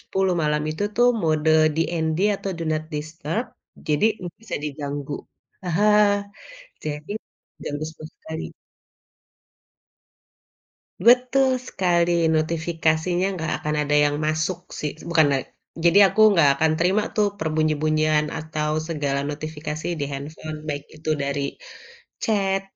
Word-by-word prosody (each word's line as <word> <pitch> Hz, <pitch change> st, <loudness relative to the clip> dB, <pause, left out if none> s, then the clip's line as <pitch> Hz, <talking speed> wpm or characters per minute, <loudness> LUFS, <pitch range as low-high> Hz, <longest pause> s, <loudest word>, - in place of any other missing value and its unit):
10 190 Hz, -1 st, 0 dB
malam 150 Hz, 0 st, +1 dB
itu 155 Hz, -, -4 dB
tuh 240 Hz, +1 st, +5 dB
mode 155 Hz, -1 st, +2 dB, 0.3 s
DND 160 Hz, -1 st, 0 dB, 0.2 s
atau 195 Hz, -, -4 dB
do 170 Hz, -, -3 dB
not 155 Hz, 0 st, -1 dB
disturb 155 Hz, -, -3 dB, 0.4 s
jadi 150 Hz, +6 st, +2 dB, 0.2 s
gak 175 Hz, -, -7 dB
bisa 225 Hz, -, -4 dB
diganggu. 145 Hz, -1 st, -4 dB, 0.5 s
Aha, 180 Hz, +4 st, +1 dB, 1.0 s
jadi 150 Hz, +4 st, -5 dB, 0.5 s
ganggu 145 Hz, +1 st, -4 dB
sekali-sekali. 160 Hz, 0 st, -8 dB, 2.6 s
Betul 255 Hz, +2 st, +5 dB, 0.2 s
sekali. 175 Hz, -2 st, +1 dB, 0.2 s
Notifikasinya 165 Hz, +2 st, 0 dB
nggak 160 Hz, -1 st, -2 dB
akan 150 Hz, 0 st, -1 dB
ada 145 Hz, +1 st, +1 dB
yang 145 Hz, 0 st, +1 dB
masuk 155 Hz, +3 st, 0 dB, 0.2 s
sih, 150 Hz, -, -2 dB, 0.2 s
bukan 160 Hz, -2 st, +5 dB
la 135 Hz, -, +3 dB, 0.5 s
jadi 175 Hz, +4 st, +6 dB
aku 220 Hz, -, +2 dB
nggak 150 Hz, -5 st, +6 dB
akan 160 Hz, 0 st, +3 dB
terima 185 Hz, +5 st, +2 dB
tuh 210 Hz, -1 st, +3 dB
perbunyi-bunyian 155 Hz, -1 st, +1 dB
atau 155 Hz, -1 st, -2 dB, 0.2 s
segala 145 Hz, -4 st, -1 dB
notifikasi 155 Hz, +1 st, -5 dB
di -, -, 0 dB
handphone, 155 Hz, +2 st, -6 dB
baik 145 Hz, -1 st, -3 dB
itu 155 Hz, 0 st, -6 dB
dari 140 Hz, 0 st, -1 dB, 0.8 s
chat, 195 Hz, -3 st, +1 dB
155 Hz, 120 wpm, -23 LUFS, 150-175 Hz, 2.6 s, jadi